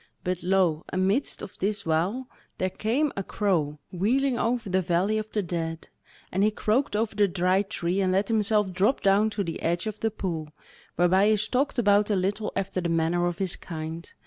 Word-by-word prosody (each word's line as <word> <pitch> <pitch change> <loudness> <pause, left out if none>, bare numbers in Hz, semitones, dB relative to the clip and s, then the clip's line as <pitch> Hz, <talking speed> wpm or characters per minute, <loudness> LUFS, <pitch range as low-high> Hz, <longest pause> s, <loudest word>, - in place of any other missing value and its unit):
But 180 0 -2
lo 180 -3 +2
amidst 195 +8 0
of - - -10
this 205 +2 -1
while, 180 +11 0 0.3
there 185 0 -1
came 265 +10 0
a 195 - -2
crow 175 -8 -1
wheeling 245 +9 +1
over 235 -1 0
the 190 0 +1
valley 185 +5 +1
of 215 0 -6
the 210 -2 -1
dead, 165 -2 -4 0.4
and 190 - 0
he 210 - +5
croaked 215 +4 0
over 220 +1 0
the 205 -1 +4
Dry 185 +1 +2
Tree, 195 -2 -1
and 185 -1 +1
let 195 +2 +1
himself 210 -3 +1
drop 205 +9 +2
down 200 +2 +4
to 205 -1 -2
the 165 -3 -5
edge 175 +2 0
of 215 -1 -4
the 225 - +1
pool, 170 -7 -4 0.5
whereby 185 +4 +4
he 215 - +4
stalked 255 +8 0
about 205 -2 +3
a 210 - +2
little 200 +3 -1
after 195 -1 -2
the 170 - -2
manner 165 +1 +1
of 175 -1 -3
his 190 -2 +1
kind. 160 0 -7
195 Hz, 200 wpm, -26 LUFS, 175-215 Hz, 0.5 s, he